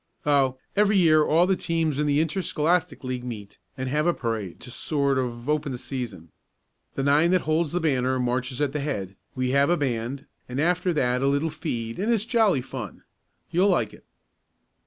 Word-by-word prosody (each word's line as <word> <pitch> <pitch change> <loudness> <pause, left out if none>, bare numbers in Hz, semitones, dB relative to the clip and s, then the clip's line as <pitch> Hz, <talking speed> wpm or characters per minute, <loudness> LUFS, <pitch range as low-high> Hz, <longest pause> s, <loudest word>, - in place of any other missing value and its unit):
"Oh, 135 -3 +3 0.2
every 205 0 +4
year 155 -4 +5
all 165 +4 +4
the 190 +1 +2
teams 165 -5 -1
in 150 - +1
the 145 +1 +3
Interscholastic 165 -1 0
League 130 -1 -3
meet 105 -6 -8 0.2
and 130 0 -3
have 150 +5 +1
a 175 - +2
parade 110 -7 -3
to 125 - -9
sort 140 0 0
of 120 -1 -4
open 150 -1 0
the 125 - -4
season. 115 - -6 0.6
The 135 - -1
nine 145 +4 +4
that 185 0 +3
holds 155 0 0
the 175 - 0
banner 130 -5 +1
marches 125 +2 -1
at 145 -2 +1
the 150 - -1
head, 100 -10 -3 0.2
we 130 -1 0
have 140 +2 +3
a 175 - +3
band, 130 0 -2 0.2
and 125 +2 -3
after 180 +3 +2
that 125 -4 +1
a 135 - +2
little 140 +3 +1
feed 120 -7 -4
and 215 +5 +1
it's 220 -2 +1
jolly 220 - +3
fun. 125 -6 -7 0.5
You'll 185 +4 +3
like 120 - +1
it." - - -17
140 Hz, 195 wpm, -25 LUFS, 125-165 Hz, 0.6 s, year